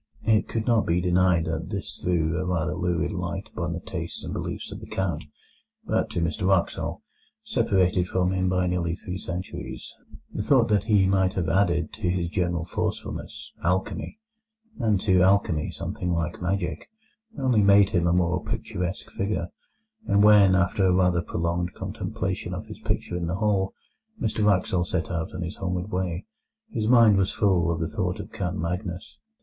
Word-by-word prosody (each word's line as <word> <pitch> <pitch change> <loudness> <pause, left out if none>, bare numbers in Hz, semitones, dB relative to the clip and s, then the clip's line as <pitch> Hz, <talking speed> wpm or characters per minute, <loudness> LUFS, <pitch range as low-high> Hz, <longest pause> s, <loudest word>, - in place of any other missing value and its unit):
It 110 -1 +3
could 110 -1 -2
not 115 -3 +2
be 85 +1 +2
denied 90 -1 +3
that 80 +1 -3
this 105 0 -5
threw 85 -3 +1
a - - -1
rather 80 -4 0
lurid 90 -1 0
light - - -4
upon - - -2
the - - -4
tastes - - -5
and - - -5
beliefs - - -4
of - - -7
the - - -10
Count; 85 -6 -2 0.6
but - - 0
to 85 - -2
Mr 85 +2 -1
Wraxall, 95 -3 0 0.4
separated 90 -2 +2
from 90 0 +1
him 95 -1 +1
by 90 0 +1
nearly 90 -2 0
three 90 0 -6
centuries, 90 0 -6 0.4
the - - -2
thought 120 +1 +3
that 105 -2 +2
he 105 -4 +4
might 95 -1 +2
have 85 -4 0
added 85 -3 +1
to 90 - -2
his 90 -1 0
general 85 -2 -1
forcefulness - - -4
alchemy, 90 - -1 0.6
and 110 -5 +2
to 95 -3 +4
alchemy 95 -5 +3
something 90 - -4
like 85 0 -1
magic, 90 -2 -2 0.5
only 125 -5 +3
made 100 0 +6
him 85 -2 +2
a - - +3
more 85 0 +1
picturesque 90 +1 -4
figure; 100 -3 -2 0.6
and 100 +1 +4
when, 105 -3 +7
after 95 +2 +2
a 95 - +4
rather 90 -1 +3
prolonged 85 +1 -2
contemplation - - -3
of - - -6
his - - -10
picture 90 - -2
in 85 -1 -2
the 85 - -1
hall, 100 -1 0 0.4
Mr 110 -1 0
Wraxall 95 -3 +2
set 85 -2 -2
out 80 -1 -2
on - - -3
his 85 +3 -5
homeward 90 +1 -3
way, 90 -1 -2 0.5
his 110 - -1
mind 115 -4 +6
was 95 -1 +2
full 90 -5 +2
of 85 -1 -1
the 80 - -1
thought - - -2
of - - -7
Count 90 +1 -3
Magnus. 90 +2 -4
90 Hz, 175 wpm, -26 LUFS, 85-100 Hz, 0.6 s, when